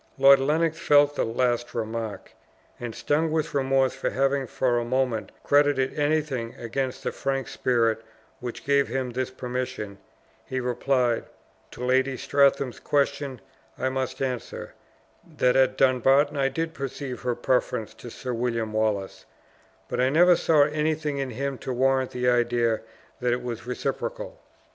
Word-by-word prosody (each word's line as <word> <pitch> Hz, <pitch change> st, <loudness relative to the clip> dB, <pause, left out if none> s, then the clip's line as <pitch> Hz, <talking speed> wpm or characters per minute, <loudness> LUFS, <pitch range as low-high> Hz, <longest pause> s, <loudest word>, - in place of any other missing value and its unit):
Lord 135 Hz, 0 st, +7 dB
Lennox 160 Hz, +4 st, +1 dB
felt 145 Hz, -2 st, +4 dB
the -, -, +1 dB
last 120 Hz, +1 st, -1 dB
remark, 115 Hz, -1 st, -4 dB, 0.5 s
and 120 Hz, -2 st, -5 dB
stung 155 Hz, +2 st, +1 dB
with 160 Hz, 0 st, -1 dB
remorse 135 Hz, -1 st, +2 dB
for -, -, -2 dB
having 135 Hz, 0 st, 0 dB
for 120 Hz, 0 st, +1 dB
a -, -, -2 dB
moment 125 Hz, -2 st, -1 dB
credited 145 Hz, -2 st, +3 dB
anything 145 Hz, -6 st, -1 dB
against 125 Hz, +2 st, -3 dB
the -, -, -1 dB
frank 135 Hz, -1 st, -2 dB
spirit 115 Hz, -3 st, +1 dB, 0.4 s
which 120 Hz, -1 st, -7 dB
gave 140 Hz, 0 st, +3 dB
him 130 Hz, +1 st, -2 dB
this 130 Hz, +1 st, -2 dB
permission, 125 Hz, -6 st, -5 dB, 0.4 s
he 130 Hz, -, -3 dB
replied, 125 Hz, -1 st, 0 dB, 0.5 s
"To 125 Hz, -, -5 dB
Lady 130 Hz, +1 st, +2 dB
Strathearn's 140 Hz, -2 st, +2 dB
questions 140 Hz, -3 st, -1 dB, 0.4 s
I 130 Hz, -, 0 dB
must 130 Hz, 0 st, -3 dB
answer, 125 Hz, -3 st, -4 dB, 0.6 s
that 125 Hz, 0 st, +3 dB
at 130 Hz, -1 st, +3 dB
Dumbarton 135 Hz, +3 st, +4 dB
I 135 Hz, -1 st, +2 dB
did 165 Hz, +4 st, -3 dB
perceive 135 Hz, -2 st, -5 dB
her 125 Hz, -1 st, -1 dB
preference 120 Hz, -3 st, 0 dB
to 120 Hz, -, -10 dB
Sir 125 Hz, +2 st, -5 dB
William 115 Hz, -2 st, -2 dB
Wallace; 105 Hz, -3 st, -1 dB, 0.6 s
but -, -, -3 dB
I 130 Hz, +1 st, +3 dB
never 175 Hz, +5 st, +6 dB
saw 155 Hz, -3 st, +4 dB
anything 150 Hz, -1 st, -1 dB
in 135 Hz, -1 st, -2 dB
him 135 Hz, +2 st, -3 dB
to 130 Hz, -, -5 dB
warrant 130 Hz, +1 st, +2 dB
the 125 Hz, 0 st, -2 dB
idea 120 Hz, -2 st, +2 dB, 0.4 s
that 125 Hz, -1 st, +1 dB
it 125 Hz, 0 st, -3 dB
was 120 Hz, -1 st, -5 dB
reciprocal. -, -, -4 dB
130 Hz, 150 wpm, -26 LUFS, 120-140 Hz, 0.6 s, Lord